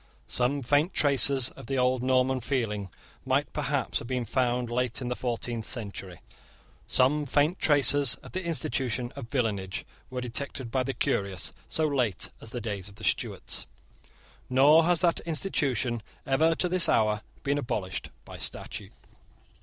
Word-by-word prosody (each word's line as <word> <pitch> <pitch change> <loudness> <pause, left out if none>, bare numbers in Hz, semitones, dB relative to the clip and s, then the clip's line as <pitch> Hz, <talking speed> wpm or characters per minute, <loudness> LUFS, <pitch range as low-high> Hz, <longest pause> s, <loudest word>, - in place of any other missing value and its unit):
Some 130 +3 0
faint 145 +8 +2
traces 135 -2 +4
of - - -13
the 135 - -1
old 125 0 +2
Norman 130 0 +2
feeling 115 -5 -2 0.3
might - - 0
perhaps - - -1
have - - -8
been 125 -1 -2
found 125 0 0
late 125 -1 0
in 125 -2 -4
the 125 - -1
fourteenth 120 -2 -3
century. 100 -6 -5 0.7
Some 145 +3 +2
faint 150 +7 +2
traces 145 -3 +5
of - - -11
the 185 - -3
institution 125 -6 0
of 130 -4 -8
villenage 105 -8 -2 0.2
were 130 - -4
detected 125 0 -3
by 130 - +1
the 130 0 -3
curious 100 -5 -1
so 160 -1 +1
late 125 - 0
as 115 - -9
the 120 - -5
days 100 -3 -4
of 100 - -16
the 110 - -12
Stuarts; - - -2 0.8
nor 145 +5 +6
has 175 0 +3
that 170 -2 +3
institution 135 - 0 0.2
ever, 160 +5 +3
to 180 - 0
this 180 0 +4
hour, 110 -1 +2 0.2
been 140 +1 +1
abolished 100 -8 -3 0.2
by - - -10
statute. - - -6
125 Hz, 155 wpm, -28 LUFS, 115-145 Hz, 0.8 s, nor